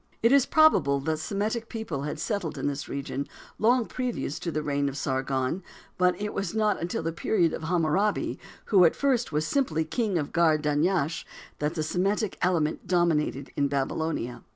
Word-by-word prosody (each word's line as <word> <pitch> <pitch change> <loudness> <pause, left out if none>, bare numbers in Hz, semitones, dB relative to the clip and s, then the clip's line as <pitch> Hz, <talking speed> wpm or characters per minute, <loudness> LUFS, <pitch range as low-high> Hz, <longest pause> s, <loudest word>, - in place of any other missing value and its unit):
It 230 - +5
is 275 -2 +5
probable 175 - +4
that 155 +2 -1
Semitic 215 +7 -2
people 210 -11 -4
had 150 +1 -4
settled 165 -5 -2
in 135 - -3
this 145 0 -3
region 140 0 -4 0.3
long 240 +2 +3
previous 245 - -3
to 170 - -3
the 155 -1 -2
reign 140 -1 0
of 140 - -7
Sargon, 130 +4 -1 0.4
but 180 +1 +3
it 210 0 -3
was 195 0 -3
not 215 -4 +1
until 170 -1 -2
the 165 - -1
period 170 0 +1
of 160 - -5
Hammurabi, 175 +4 +1 0.3
who 190 -4 +5
at 165 - +5
first 260 - +1
was 150 +1 0
simply 160 - 0
king 205 +2 -1
of 150 -3 -3
Gar 165 -2 +4
Dunyash 155 +2 0 0.4
that 150 +3 -1
the 155 - -1
Semitic 195 +5 -1
element 165 -4 0
dominated 160 -6 +1
in 140 - +2
Babylonia. 140 -2 -2
165 Hz, 175 wpm, -27 LUFS, 150-205 Hz, 0.4 s, It